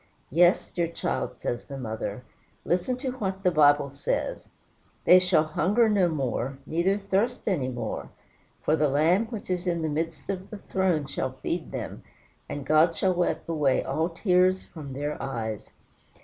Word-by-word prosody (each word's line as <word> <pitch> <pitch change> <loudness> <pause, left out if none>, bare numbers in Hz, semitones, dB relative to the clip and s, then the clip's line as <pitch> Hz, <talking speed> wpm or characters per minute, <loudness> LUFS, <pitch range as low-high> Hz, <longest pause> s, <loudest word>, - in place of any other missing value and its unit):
"Yes, 175 +5 +4
dear 170 -1 0
child," 170 - -3
says 120 - -3
the 140 - -7
mother; 110 -2 -4 0.4
"listen 185 +9 0
to 260 0 -3
what 195 -6 -4
the 180 - +4
Bible 145 -3 +4
says: 140 +1 -3 0.6
'They 180 - +8
shall 180 -4 +3
hunger 185 +9 +2
no 195 -4 +3
more, 135 -3 -2
neither 170 +6 +1
thirst 205 +5 -1
any 160 -11 +1
more; 120 -2 -4 0.5
for 155 - +3
the 150 -1 +2
Lamb 165 +10 +3
which 220 -5 -6
is 180 0 -2
in 170 -2 0
the 160 - 0
midst 160 +1 -3
of 190 -1 -4
the 215 - -7
throne 190 -6 0
shall 130 -1 -3
feed 170 -1 -2
them; - - -5 0.5
and 145 -2 -5
God 160 +2 +4
shall 190 -1 +2
wipe 175 0 -1
away 150 -5 +2
all 160 +2 0
tears 185 +1 +2
from 145 -5 -9
their 145 +2 -3
eyes.'" 115 -5 -4
165 Hz, 165 wpm, -27 LUFS, 145-185 Hz, 0.6 s, They